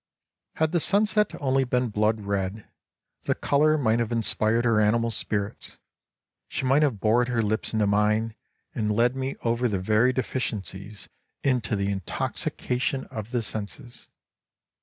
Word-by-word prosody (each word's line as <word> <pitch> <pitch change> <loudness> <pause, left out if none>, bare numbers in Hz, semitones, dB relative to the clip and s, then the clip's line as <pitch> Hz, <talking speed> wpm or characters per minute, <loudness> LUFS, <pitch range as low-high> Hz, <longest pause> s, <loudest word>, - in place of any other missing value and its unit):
Had 160 0 +1
the 175 - +2
sunset 210 +4 +2
only 135 -1 +2
been 125 -1 0
blood 105 +1 +1
red, 100 +1 -3 0.6
the - - +1
color 155 +2 +2
might 115 -5 +2
have 115 -1 -1
inspired 115 0 +1
her 115 -2 +3
animal 115 +2 +2
spirits, 105 -1 -2 0.7
she - - -3
might 135 +3 +4
have 135 -9 +1
bored 115 +4 +3
her 120 -2 0
lips 110 +1 0
into 110 -2 +1
mine, 105 +2 +1 0.4
and 105 -1 -1
led 120 +4 +2
me 135 +1 -3
over 120 +1 +1
the 105 -4 -1
very 110 +6 +3
deficiencies 105 -6 -4 0.4
into 125 -5 +1
the 100 0 -1
in 100 - -2
toxication 125 +8 -2
of 110 0 -6
the 120 -2 -1
senses 110 +4 -5
115 Hz, 150 wpm, -26 LUFS, 105-130 Hz, 0.7 s, might